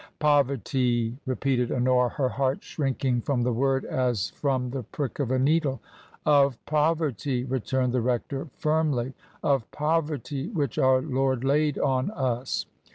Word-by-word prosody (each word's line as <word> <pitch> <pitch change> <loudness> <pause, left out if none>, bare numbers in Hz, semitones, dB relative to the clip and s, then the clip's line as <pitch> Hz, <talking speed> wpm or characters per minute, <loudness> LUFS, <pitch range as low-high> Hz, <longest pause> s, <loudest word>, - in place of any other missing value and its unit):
"Poverty!" 130 -5 +1
repeated 130 -1 0
Honora, 125 0 +3
her 130 -1 -1
heart 135 0 -1
shrinking 135 -4 -1
from 125 -1 0
the 125 0 +1
word 135 +2 +1
as 120 -6 0
from 130 -3 -1
the 135 0 -3
prick 135 +4 -5
of 140 -4 0
a 130 - +2
needle. 140 -1 +2 0.5
"Of 140 -4 +4
poverty," 150 -5 0
returned 130 0 -1
the 125 - +2
rector, 125 +4 -2
firmly; 150 -5 0 0.3
"of 135 -5 +1
poverty 150 -2 -1
which 150 - -2
our 130 0 +4
Lord 135 -3 0
laid 145 +1 +2
on 130 +2 +1
us. 130 - -2
135 Hz, 140 wpm, -26 LUFS, 125-145 Hz, 0.5 s, Of